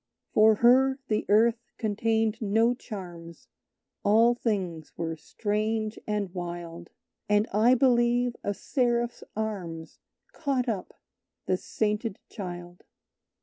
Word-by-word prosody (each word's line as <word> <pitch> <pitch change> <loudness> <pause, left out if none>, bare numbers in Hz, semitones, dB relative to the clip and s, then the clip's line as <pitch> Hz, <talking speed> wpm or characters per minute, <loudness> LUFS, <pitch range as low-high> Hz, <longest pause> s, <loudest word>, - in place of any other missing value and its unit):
"For 215 0 +6
her 265 +2 +5
the 215 -1 0
Earth 225 +3 +4 0.2
contained 220 0 0
no 225 +3 +3
charms; 175 -8 -9 0.5
All 225 +4 +5
things 185 -10 -3
were 165 -1 -2
strange 215 +6 -2
and 205 -4 -2
wild; 175 -1 -6 0.4
And 210 +1 +3
I 230 +5 +5
believe 245 -1 +3
a 205 - -1
Seraph's 240 -1 0
arms 185 -7 -5 0.3
Caught 270 -5 -1
up 200 -5 -4 0.5
the 185 - +2
sainted 210 +2 -2
Child." 175 -3 -8
215 Hz, 105 wpm, -27 LUFS, 185-235 Hz, 0.5 s, For